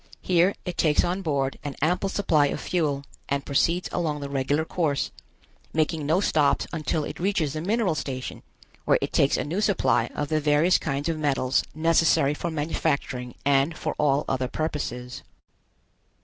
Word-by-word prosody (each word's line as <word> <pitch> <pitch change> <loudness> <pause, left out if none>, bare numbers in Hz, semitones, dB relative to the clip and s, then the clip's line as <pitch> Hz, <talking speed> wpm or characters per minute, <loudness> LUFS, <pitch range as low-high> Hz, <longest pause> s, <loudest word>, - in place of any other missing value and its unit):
Here 180 +2 +3
it 180 -2 -5
takes 155 -2 +3
on 180 +2 -1
board 140 -6 -1
an 145 -2 -5
ample 180 +6 +1
supply 155 -8 +2
of - - -3
fuel 150 -6 -1 0.3
and 140 0 -1
proceeds 170 +5 +1
along 155 -4 -1
the 140 0 -5
regular 140 +3 0
course, 155 -5 -1 0.6
making 155 -1 0
no 160 +4 +3
stops 150 -7 +2
until 155 -1 -1
it - - -6
reaches 170 -6 0
the 155 - -3
mineral 205 0 +1
station 130 -4 -5 0.4
where - - +4
it - - -4
takes 140 - +3
a - - -1
new 175 +8 -2
supply 130 - +2
of 145 -1 -2
the 155 -1 +1
various 150 +5 +3
kinds 140 +2 -2
of 165 -2 -1
metals 135 -3 +1
necessary 160 -3 +3
for 170 +3 -3
manufacturing 145 -5 -2
and 140 +3 +2
for - - -2
all 145 0 +2
other 130 -1 0
purposes. 125 -5 -4
150 Hz, 165 wpm, -25 LUFS, 140-170 Hz, 0.6 s, where